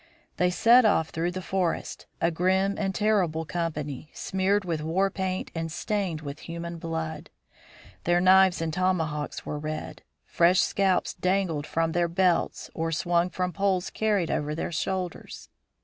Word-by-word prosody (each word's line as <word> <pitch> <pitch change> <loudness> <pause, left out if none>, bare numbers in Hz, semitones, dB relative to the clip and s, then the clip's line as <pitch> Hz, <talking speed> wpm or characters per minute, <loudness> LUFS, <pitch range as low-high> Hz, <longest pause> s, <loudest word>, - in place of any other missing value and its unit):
They 180 - +3
set 235 +7 +6
off 160 -7 +3
through 165 +2 -1
the 185 +1 -5
forest, 185 -2 -2
a 170 - +2
grim 190 +4 +2
and 195 -1 -2
terrible 185 -7 +1
company, 155 -4 -4
smeared 190 +1 0
with 165 -3 -2
war 185 +5 +1
paint 185 -1 -3
and 165 -1 -3
stained 185 -3 -2
with 145 0 -7
human 170 0 -5
blood. 160 -1 -4 0.8
Their 175 +1 +3
knives 185 -1 +5
and 160 -1 -2
tomahawks 160 -5 -1
were 150 - -4
red; 155 +1 -5 0.2
fresh 175 +2 +3
scalps 190 -2 +1
dangled 180 -5 0
from 165 0 0
their 175 +1 +1
belts 175 0 0
or 165 0 -2
swung 175 +2 +1
from 180 0 -2
poles 190 0 0
carried 205 -6 0
over 150 +1 -1
their 165 - -3
shoulders. 180 +2 -4
175 Hz, 150 wpm, -27 LUFS, 160-190 Hz, 0.8 s, set